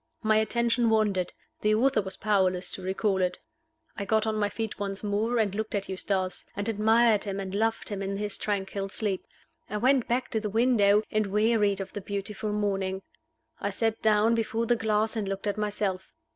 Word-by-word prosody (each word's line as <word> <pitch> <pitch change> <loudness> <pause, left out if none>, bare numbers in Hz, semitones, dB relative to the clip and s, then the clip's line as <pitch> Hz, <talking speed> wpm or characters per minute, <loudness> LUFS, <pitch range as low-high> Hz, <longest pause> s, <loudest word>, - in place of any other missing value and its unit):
My 215 0 +4
attention 235 +1 +2
wandered; 205 -5 +1 0.3
the 215 0 +3
author 250 0 +3
was 190 -1 -7
powerless 190 -3 +1
to - - -4
recall 190 +1 0
it. 180 0 0 0.6
I 200 - -3
got 220 +2 +1
on 220 -1 0
my 205 -1 +1
feet 220 -2 -4
once 200 0 -4
more, 215 +4 0
and 210 -4 +1
looked 220 +1 -3
at 200 -1 -2
Eustace, 190 -1 -2
and 200 +1 -2
admired 220 0 +3
him 200 -1 -3
and 190 -1 -5
loved 225 +2 0
him 200 -2 -4
in 195 0 -2
his 205 0 -1
tranquil 195 -1 -2
sleep. 200 -2 -2 0.5
I 210 - -2
went 255 +2 +3
back 250 +2 -1
to 220 - +1
the 210 -1 -3
window, 215 -2 +4
and 215 -1 +1
wearied 210 -1 +2
of 195 - -6
the 205 - -5
beautiful 200 +2 -4
morning. 195 -2 -1 0.6
I 200 - -1
sat 225 +2 -1
down 215 +1 +4
before 225 0 0
the 240 - +3
glass 220 -1 0
and 210 -3 -2
looked 195 +1 -4
at 205 -1 0
myself. 205 -3 -2
210 Hz, 195 wpm, -28 LUFS, 195-220 Hz, 0.6 s, My